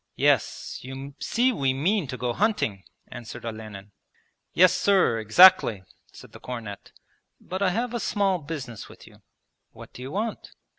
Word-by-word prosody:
'Yes, - - 0
you 135 +2 -8
see 250 +2 +1
we 135 - 0
mean 175 +4 0
to 130 0 -6
go 125 -1 -2
hunting,' 180 - -1 0.3
answered 120 -1 -9
Olenin. 110 -3 -8 0.6
'Yes, 185 0 +5
sir, 190 - +2
exactly,' 110 - +6 0.3
said - - -14
the - - -13
cornet, 115 -5 -8 0.5
'but 185 +2 -6
I 195 - +3
have 235 +6 -2
a 240 - -2
small 200 -4 0
business 140 -7 -7
with - - -15
you.' - - -18 0.5
'What - - -13
do - - -11
you 130 - -6
want?' 215 +7 -4
140 Hz, 155 wpm, -25 LUFS, 115-195 Hz, 0.6 s, exactly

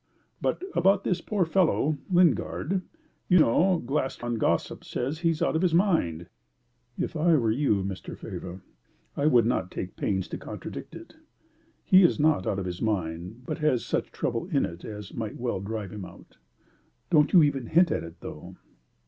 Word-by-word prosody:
But - - -1
about 195 +2 +3
this 180 -2 0
poor 200 -2 0
fellow, 160 -4 +2
Lingard. 180 0 +2 0.5
You 180 - +6
know 175 +5 +4
Glaston 120 -4 -2
gossip - - 0
says 135 +5 -3
he 170 -1 +2
is 160 -2 0
out - - +1
of 160 - +1
his 175 -3 +2
mind." 160 - +1 0.7
"If - - -3
I 165 +1 +4
were 115 -6 +2
you, 110 -6 +1
Mr. 95 -1 -6
Faber, 90 +1 -8 0.5
I 145 - +1
would 120 -7 +5
not 115 -6 0
take 90 - -6
pains 95 -2 -1
to - - -5
contradict - - -8
it. - - -12 0.7
He 190 0 +6
is 175 -3 +4
not 150 -10 +2
out 95 - 0
of 100 - -3
his 90 -1 -5
mind, 90 +1 -3
but - - -4
has 150 -6 +1
such - - -2
trouble - - -2
in - - +1
it 85 +1 -8
as 105 -3 -8
might 110 -2 -5
well 120 -5 -2
drive 105 -1 -5
him 100 -2 -7
out. - - -15 0.7
Don't 150 -3 +4
you 175 -4 +7
even 135 -5 0
hint 170 +5 +4
at - - 0
that, 85 0 -11
though." - - -9
135 Hz, 180 wpm, -27 LUFS, 100-170 Hz, 0.7 s, you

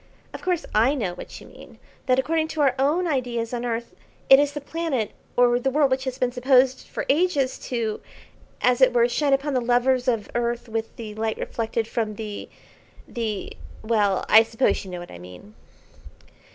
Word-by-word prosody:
"Of - - -7
course 360 -3 -1
I 235 +7 +3
know 200 -10 -2
what 175 - -9
you - - -14
mean, - - -15 0.3
that 255 -1 +3
according 315 +4 +1
to 315 -1 -3
our 275 -3 +4
own 305 +7 +2
ideas 245 -6 -2
on 240 0 -3
earth, 235 -1 -3 0.4
it 270 - +10
is 290 0 +1
the 295 - -4
planet 285 -6 -2 0.3
or 245 0 +4
the 270 - 0
world 280 0 +2
which 260 +1 0
has 260 -1 -3
been 250 -2 0
supposed 255 +1 +2
for - - -5
ages 290 -4 +1
to, 230 -4 -2 0.6
as 250 +1 +2
it 255 -1 +6
were, 235 -1 +4
shine 285 +3 0
upon 275 +1 +1
the 255 - +1
lovers 245 +1 +2
of 230 -4 0
earth 240 0 -2
with 225 0 -4
the 220 -2 -7
light 220 +1 -2
reflected 225 -1 -3
from 220 -2 -2
the 210 -1 -7 0.6
the 220 -4 -4 0.3
well, 210 -4 +1
I 220 - +8
suppose 225 +3 0
you 190 - -10
know 180 -1 -6
what 175 - -10
I 85 - -10
mean." 90 +3 -13
245 Hz, 190 wpm, -24 LUFS, 225-270 Hz, 0.6 s, it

